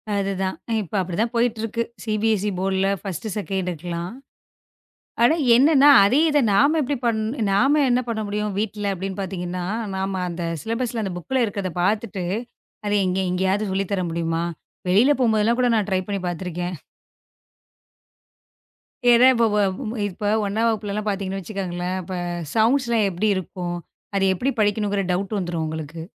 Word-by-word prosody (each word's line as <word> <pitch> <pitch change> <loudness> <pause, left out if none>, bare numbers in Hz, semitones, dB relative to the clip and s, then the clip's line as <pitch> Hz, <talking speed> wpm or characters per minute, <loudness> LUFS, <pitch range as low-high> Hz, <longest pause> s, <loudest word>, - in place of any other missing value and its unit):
அது 195 0 0
தான். 190 - -1 0.3
இப்ப 190 0 -7
அப்டி 180 -2 -4
தான் 230 +1 -1
போயிட்டு 235 -1 +1
இருக்கு. 230 +1 -1 0.2
CBSE 215 -2 +1
போர்டுல 190 0 +1
1,2 190 -3 -4
எல்லாம். 170 +3 -4 1.1
ஆனா, 270 +7 +6 0.2
என்னன்னா 285 +1 +6 0.2
அதே 245 +9 +4
இத 295 - +3
நாம 285 +11 +4
எப்படி 285 +1 -1
பண் 230 -2 +1 0.3
நாம 275 +10 +4
என்ன 245 - +3
பண்ண 225 -2 -2
முடியும் 210 0 -2
வீட்டுல 205 -1 -2
அப்டின்னு 190 +1 -5
பாத்தீங்கன்னா, 180 -2 -4 0.3
நாம 190 0 -2
அந்த 170 0 -4 0.2
சிலபஸ்ல 230 0 -2
அந்த 190 - -3
புக்ல 255 +8 0
இருக்குறத 200 -4 -3
பாத்துட்டு, 205 -1 -1 0.6
அத 205 - 0 0.2
இங்க 185 +1 0
எங்கயாது 190 +3 0
சொல்லித் 195 +1 -2
தர 190 -2 0
முடியுமா? 165 0 -1 0.4
வெளியில 220 +11 +5
போம்போதெல்லாம் 230 0 +2
கூட 250 - +3
நான் 210 -2 0
ட்ரை 185 - +2
பண்ணி 200 -1 -2
பாத்திருக்கேன். 175 0 -3 2.4
ஏன்னா 240 +2 +7
இப்ப 235 -2 +3 0.6
இப்ப 205 +3 -7 0.2
1 220 +3 +1
வகுப்புலலாம் 215 -1 -2
பாத்தீங்கன்னு 195 -1 -2
வச்சுக்கோங்களேன்! 185 -2 -3 0.6
சௌண்ட்ஸ்லாம் 230 -1 +3
எப்படி 190 +4 -1
இருக்கும்? 180 -1 -4 0.4
அதை 195 - +2
எப்படி 250 +9 -1
படிக்கணும்ங்கற 205 -1 +1
டவுட் 195 +3 -1
வந்துரும் 175 -3 -2
உங்களுக்கு. 160 +1 -6
200 Hz, 140 wpm, -23 LUFS, 185-225 Hz, 2.4 s, ஏன்னா